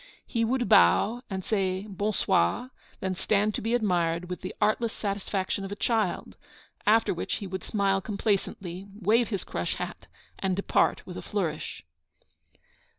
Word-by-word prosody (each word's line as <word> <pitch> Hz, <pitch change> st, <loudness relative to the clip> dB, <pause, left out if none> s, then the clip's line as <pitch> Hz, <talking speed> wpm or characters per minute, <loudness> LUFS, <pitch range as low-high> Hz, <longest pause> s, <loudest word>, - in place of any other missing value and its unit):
He 230 Hz, -2 st, 0 dB
would 245 Hz, +1 st, +1 dB
bow 200 Hz, -, +5 dB
and 190 Hz, -2 st, -4 dB
say 190 Hz, -2 st, 0 dB
'Bon 205 Hz, +1 st, -1 dB
soir,' 215 Hz, -, +1 dB, 0.3 s
then 190 Hz, -1 st, -1 dB
stand 210 Hz, +3 st, +1 dB
to -, -, -3 dB
be 225 Hz, +3 st, +1 dB
admired, 180 Hz, -5 st, +1 dB
with 180 Hz, -, -4 dB
the 185 Hz, -, -6 dB
artless 225 Hz, +1 st, +2 dB
satisfaction 200 Hz, -2 st, -2 dB
of 195 Hz, -, -6 dB
a -, -, -3 dB
child; 220 Hz, -3 st, 0 dB, 0.5 s
after 225 Hz, +2 st, +5 dB
which 170 Hz, -, -2 dB
he 200 Hz, -, -5 dB
would 190 Hz, -1 st, -5 dB
smile 195 Hz, -2 st, +1 dB
complacently, 195 Hz, -2 st, -2 dB
wave 225 Hz, +4 st, +3 dB
his 200 Hz, -5 st, -2 dB
crush 85 Hz, 0 st, -3 dB
hat, -, -, -6 dB, 0.3 s
and 190 Hz, -1 st, 0 dB
depart 200 Hz, -, +2 dB
with 180 Hz, -, -7 dB
a -, -, -4 dB
flourish. 160 Hz, -, -3 dB
200 Hz, 155 wpm, -28 LUFS, 185-215 Hz, 0.5 s, bow